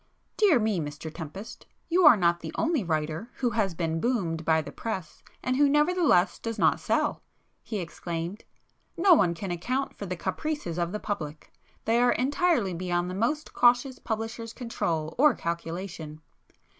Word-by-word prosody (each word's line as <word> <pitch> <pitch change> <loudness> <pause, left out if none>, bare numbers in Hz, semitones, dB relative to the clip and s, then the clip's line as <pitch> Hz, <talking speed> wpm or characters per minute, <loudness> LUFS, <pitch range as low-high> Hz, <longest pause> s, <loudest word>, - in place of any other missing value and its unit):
"Dear 395 -10 +5
me, 215 -5 +1
Mr 150 +1 -6
Tempest, 180 +7 -8 0.2
you 350 -1 +5
are 250 - +9
not 175 -2 +2
the 160 -2 -6
only 315 -7 +1
writer 155 +5 -2
who 245 -2 0
has 205 -5 0
been 165 -1 -1
'boomed' 180 -10 0
by 160 0 +3
the - - -8
press 185 -9 -5 0.2
and 255 - 0
who 285 0 +5
nevertheless 295 - +3
does 230 -1 -4
not - - +3
sell,"—he 220 - -3
exclaimed—"No 180 - -2
one 175 - +3
can 185 +2 -5
account 255 +11 -2
for 200 - -6
the 180 - -3
caprices 290 - -3
of 170 0 -1
the 210 - -3
public; 155 -9 -5 0.3
they 230 +2 +3
are 245 0 +4
entirely 275 - +1
beyond 175 0 -1
the - - -5
most 240 +10 -1
cautious 245 +2 +3
publisher's 225 +1 -4
control 165 -10 -2
or 295 -2 +6
calculation. 170 -2 -5
200 Hz, 155 wpm, -27 LUFS, 170-250 Hz, 0.3 s, are